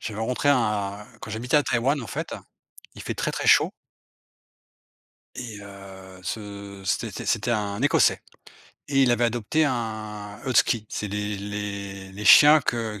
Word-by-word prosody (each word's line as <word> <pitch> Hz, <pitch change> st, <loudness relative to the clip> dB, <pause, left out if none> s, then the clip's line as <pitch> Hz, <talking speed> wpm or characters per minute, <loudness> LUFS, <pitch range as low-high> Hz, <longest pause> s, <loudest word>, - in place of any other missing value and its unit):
j'avais 110 Hz, 0 st, -5 dB
rencontré 125 Hz, +5 st, -1 dB
un 105 Hz, -6 st, +1 dB, 0.2 s
quand -, -, -8 dB
j'habitais 120 Hz, +6 st, 0 dB
à 145 Hz, -, +5 dB
Taïwan, 135 Hz, +3 st, 0 dB
en 115 Hz, -, -7 dB
fait, -, -, -5 dB, 0.6 s
il -, -, -9 dB
fait -, -, -4 dB
très, -, -, -2 dB
très -, -, -3 dB
chaud -, -, +5 dB, 1.6 s
et 115 Hz, -5 st, -7 dB
heu, 95 Hz, -2 st, -12 dB
ce 100 Hz, -1 st, -7 dB
c'était- -, -, -2 dB
c'était 110 Hz, +3 st, 0 dB
un 105 Hz, -2 st, -2 dB
Écossais, 145 Hz, +3 st, +3 dB, 0.7 s
et 135 Hz, -1 st, +2 dB
il 125 Hz, -, +3 dB
avait 120 Hz, 0 st, +2 dB
adopté 120 Hz, +7 st, 0 dB
un 110 Hz, -4 st, -4 dB
husky. 115 Hz, -3 st, +2 dB
C'est 105 Hz, -, -4 dB
les 105 Hz, +1 st, -3 dB
les 100 Hz, -1 st, -6 dB
les 105 Hz, +2 st, -7 dB
chiens 150 Hz, +8 st, +8 dB
que 115 Hz, -4 st, -2 dB
105 Hz, 150 wpm, -25 LUFS, 100-120 Hz, 1.6 s, chiens